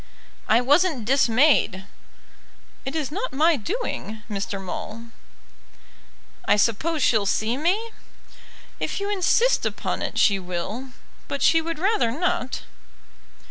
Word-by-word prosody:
"I 225 +3 +4
wasn't 290 - +2
dismayed." 250 -5 +3 1.0
"It 270 +3 -4
is 300 -3 -2
not 425 +10 -4
my 315 +4 +4
doing, 230 - -4
Mr. 200 0 -3
Maule." 220 +5 -7 1.3
"I - - +4
suppose 260 +9 +1
she'll 215 -4 +3
see 220 +4 +1
me?" 380 - 0 0.9
"If - - -2
you 400 +1 -2
insist 415 +5 +2
upon - - -2
it - - -4
she 200 -2 +4
will; 185 +8 -5 0.4
but 280 - -3
she 325 - +5
would 330 0 -4
rather 390 - +1
not." 260 -1 -2
270 Hz, 120 wpm, -24 LUFS, 220-335 Hz, 1.3 s, she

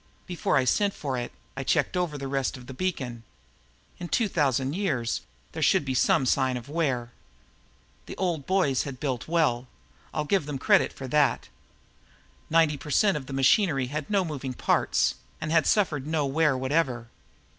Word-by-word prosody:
Before 175 -4 0
I 130 - +2
sent 200 +9 +2
for 135 -3 -3
it, 120 -1 -4 0.2
I 135 - -4
checked 150 +5 +1
over 175 -5 -1
the 135 -1 -5
rest 135 0 -1
of 125 - -12
the 130 - -9
beacon. 130 -8 -3 0.8
In 175 - -5
2000 145 - +1
years, 145 - -1 0.3
there - - -6
should - - +3
be 130 - -1
some 130 +1 +3
sign 130 0 +1
of 120 - -9
wear. 135 -6 -1 1.0
The - - -8
old 170 -7 -2
boys 185 -9 +2
had 135 -3 -6
built 130 -4 -3
well, 150 -7 +1 0.4
I'll 150 - -2
give 180 -2 +1
them 145 -2 -3
credit - - +3
for 135 - -8
that. 150 0 +2 1.0
Ninety 160 -2 +3
per 150 - -10
cent 200 +4 +3
of 140 -3 -5
the 135 - -6
machinery 135 - +3
had 150 -1 -4
no 200 -3 +2
moving 135 -5 -5
parts - - +1 0.3
and 155 0 -3
had 165 -2 +3
suffered 155 -10 +1
no 155 -2 0
wear 145 0 +2
whatever. 130 -3 -1
145 Hz, 175 wpm, -27 LUFS, 130-165 Hz, 1.0 s, should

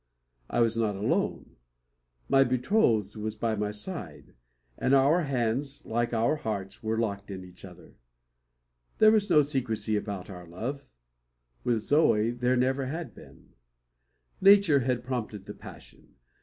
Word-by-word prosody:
I 120 - +1
was 115 -1 +2
not 110 -3 0
alone. 100 +2 -2 0.7
My 135 0 +5
betrothed 125 - +1
was 110 0 -4
by 110 0 -1
my 105 0 -2
side; 105 - -7 0.4
and 135 - +2
our 150 +5 +4
hands, 135 +1 -2
like 120 +1 -1
our 115 +6 +1
hearts, 100 -7 -5
were 110 0 -1
locked 100 -3 -2
in 95 -2 -7
each 90 0 -16
other. 90 -2 -13 1.0
There 215 0 +7
was 215 -2 +2
no 150 -4 +6
secrecy 120 -6 -1
about 100 -3 -4
our 90 -3 -10
love; 130 +11 -6 0.8
with 115 -3 +1
Zoe 115 -6 +3
there 125 +1 0
never 130 +1 +1
had 160 +4 -5
been. - - -16 0.9
Nature 195 -6 +6
had 125 -1 -1
prompted 115 -6 -4
the - - -7
passion. - - -14
120 Hz, 140 wpm, -28 LUFS, 105-140 Hz, 1.0 s, There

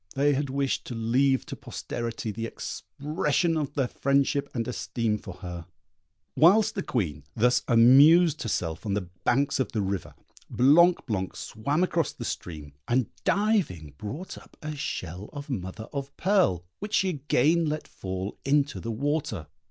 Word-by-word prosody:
They 145 +2 +3
had 140 0 -1
wished 135 0 -1
to 120 - -6
leave 130 +4 +2
to - - -6
posterity 115 -2 -5
the 115 +2 -4
expression 155 +6 -2
of 145 -2 -2
their 135 -4 +1
friendship 140 +2 +1
and 115 -3 -3
esteem 115 -3 -2
for 95 -4 -9
her. 85 -1 -6 0.7
Whilst 205 +7 +5
the 195 - -2
Queen 80 - -2
thus 125 +3 +3
amused 140 +8 +6
herself 85 -7 -2
on 100 -3 -1
the 95 -4 -3 0.2
banks 140 +3 +2
of 130 - -1
the 110 - 0
river, 95 -1 -3 0.3
Blanc 170 +8 +5
blanc 95 -5 -2
swam 140 +10 -1
across 170 -4 0
the - - -7
stream, 75 -4 -6
and 125 -1 +1
diving 195 - +1
brought 135 - -6
up - - -20
a 155 0 -4
shell 95 - -5
of 145 -1 -7
mother 110 0 -5
of 140 0 -5
pearl, 180 - +2
which 205 +1 -3
she 190 - +3
again 155 +1 +2
let 155 +1 -3
fall 95 +1 -5
into 145 +1 +1
the 115 - -6
water. 135 - -2
130 Hz, 160 wpm, -27 LUFS, 105-150 Hz, 0.7 s, amused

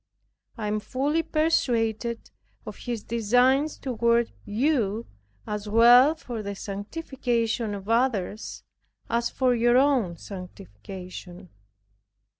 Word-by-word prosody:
I 220 - -4
am 210 +1 0
fully 280 +8 0
persuaded 240 -8 0 0.3
of - - -7
His 235 -4 -5
designs 250 +6 +2
toward 235 -2 +1
you, 230 -2 0 0.4
as 210 0 -4
well 245 +7 +7
for 240 -8 -6
the 200 -1 -5
sanctification 230 0 -2
of 195 0 -9
others, 225 -3 -1 0.5
as 235 +1 +1
for 255 -2 +1
your 240 +1 +3
own 255 -11 +2
sanctification. 180 - -10
230 Hz, 100 wpm, -26 LUFS, 205-255 Hz, 0.5 s, well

